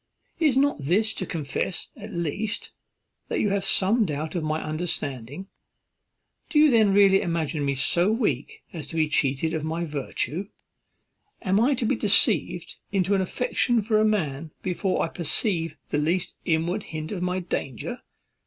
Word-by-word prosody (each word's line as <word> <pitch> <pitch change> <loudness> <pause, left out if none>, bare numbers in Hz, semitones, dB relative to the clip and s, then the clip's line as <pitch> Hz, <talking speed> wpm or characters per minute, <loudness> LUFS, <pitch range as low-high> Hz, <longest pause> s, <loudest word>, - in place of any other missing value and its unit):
Is 300 -6 +3
not 280 - +2
this 200 +9 +2
to 185 - -3
confess, 160 +3 -3
at - - -9
least, 195 +7 -3 0.6
that - - -1
you 210 - +2
have 200 0 0
some 220 +5 +3
doubt 155 +1 -3
of 175 -3 -2
my 155 0 -1
understanding? 155 -2 -3 1.0
do 305 - 0
you 300 -1 +7
then 220 -4 +5
really 195 -1 +5
imagine 165 -4 -1
me 140 -1 0
so 170 +8 +3
weak 205 - -1
as 160 -4 -6
to - - -8
be 160 -1 +2
cheated 145 +1 +1
of 160 -2 -2
my 165 +2 -2
virtue? 150 +4 -2 1.0
am 190 +2 +2
I 265 +5 +3
to 235 - -2
be - - +2
deceived - - +2
into 195 0 +1
an 195 - +3
affection 240 +3 +1
for 215 0 +2
a - - +4
man 160 -8 0
before 185 0 0
I - - 0
perceive 165 -1 -1
the 145 - 0
least 175 +4 -1
inward 170 +5 0 0.2
hint 155 0 -5
of 190 -4 -4
my 180 +1 0
danger? 135 -8 -4
175 Hz, 165 wpm, -25 LUFS, 155-205 Hz, 1.0 s, you